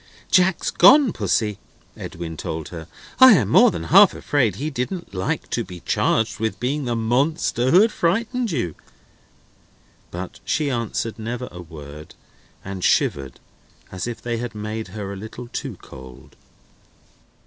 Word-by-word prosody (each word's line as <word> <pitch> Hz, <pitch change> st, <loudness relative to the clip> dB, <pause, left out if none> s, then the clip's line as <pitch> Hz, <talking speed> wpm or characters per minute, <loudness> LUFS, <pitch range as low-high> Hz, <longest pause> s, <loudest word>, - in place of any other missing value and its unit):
"Jack's 185 Hz, -1 st, +3 dB
gone, 255 Hz, -, +6 dB
Pussy," 105 Hz, 0 st, -1 dB, 0.4 s
Edwin 85 Hz, -1 st, -7 dB
told 80 Hz, 0 st, -5 dB
her. 80 Hz, -2 st, -9 dB, 0.3 s
"I 260 Hz, -2 st, +10 dB
am 120 Hz, -, +2 dB
more -, -, +6 dB
than 85 Hz, -2 st, -5 dB
half 80 Hz, -, +6 dB
afraid 125 Hz, -10 st, 0 dB
he 150 Hz, +7 st, -4 dB
didn't 135 Hz, -, -4 dB
like 95 Hz, -1 st, -2 dB
to -, -, -1 dB
be 90 Hz, -2 st, -11 dB
charged 115 Hz, 0 st, 0 dB
with 110 Hz, 0 st, -2 dB
being 140 Hz, +3 st, -2 dB
the 120 Hz, -1 st, -1 dB
Monster 125 Hz, +2 st, 0 dB
who 180 Hz, +7 st, +6 dB
had 220 Hz, +1 st, +3 dB
frightened 230 Hz, +8 st, 0 dB
you." 120 Hz, -, -2 dB, 1.4 s
But 90 Hz, +1 st, -7 dB
she 150 Hz, -2 st, -1 dB
answered 115 Hz, -2 st, -3 dB
never 120 Hz, +3 st, -4 dB
a 90 Hz, -, -9 dB
word, 75 Hz, -2 st, -11 dB, 0.5 s
and 95 Hz, -1 st, -6 dB
shivered, 80 Hz, -, +1 dB, 0.5 s
as 95 Hz, +4 st, -5 dB
if 120 Hz, -2 st, -5 dB
they 120 Hz, -1 st, -2 dB
had 120 Hz, -1 st, -5 dB
made 105 Hz, +1 st, -5 dB
her 100 Hz, 0 st, -6 dB
a -, -, -7 dB
little 110 Hz, +5 st, -9 dB
too -, -, -5 dB
cold. 65 Hz, 0 st, -13 dB
115 Hz, 150 wpm, -22 LUFS, 90-145 Hz, 1.4 s, I